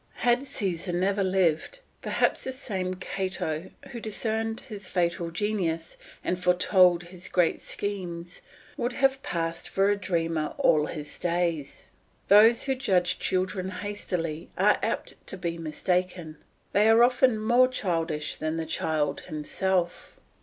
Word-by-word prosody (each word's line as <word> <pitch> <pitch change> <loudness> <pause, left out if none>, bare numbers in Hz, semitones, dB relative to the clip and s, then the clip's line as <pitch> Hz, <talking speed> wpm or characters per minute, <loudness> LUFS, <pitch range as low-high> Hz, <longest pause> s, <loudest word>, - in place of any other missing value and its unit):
Had 245 +3 +3
Caesar 185 -7 -2
never 195 +3 +1
lived, 185 - +1 0.2
perhaps - - +1
this 260 0 -5
same 185 -8 -3
Cato, 185 -3 -3 0.2
who 240 - -6
discerned 225 +1 -2
his 205 -5 -8
fatal 170 -2 0
genius, 170 -3 -2 0.3
and 180 0 -1
foretold 180 -1 +4
his 180 +1 -10
great 175 -3 +2
schemes, 180 -4 -5 0.4
would 245 0 -1
have 270 +1 +2
passed 165 - -3
for 195 +1 +3
a - - +3
dreamer 165 -5 -1
all 150 -1 +3
his 150 -2 -7
days. 170 -4 -2 0.4
Those 220 +3 +7
who 270 - +1
judge 185 -9 +1
children 185 0 -1
hastily 180 -5 -4
are - - +4
apt - - -2
to 190 - -5
be 170 -2 -3
mistaken; 170 0 -2 0.4
they 210 +2 +5
are 225 +1 +7
often 250 -1 +4
more 240 +4 +4
childish 165 -10 -2
than 155 +1 -2
the 165 - -2
child 155 -2 -1
himself. 175 +4 -2
185 Hz, 135 wpm, -27 LUFS, 165-205 Hz, 0.4 s, Those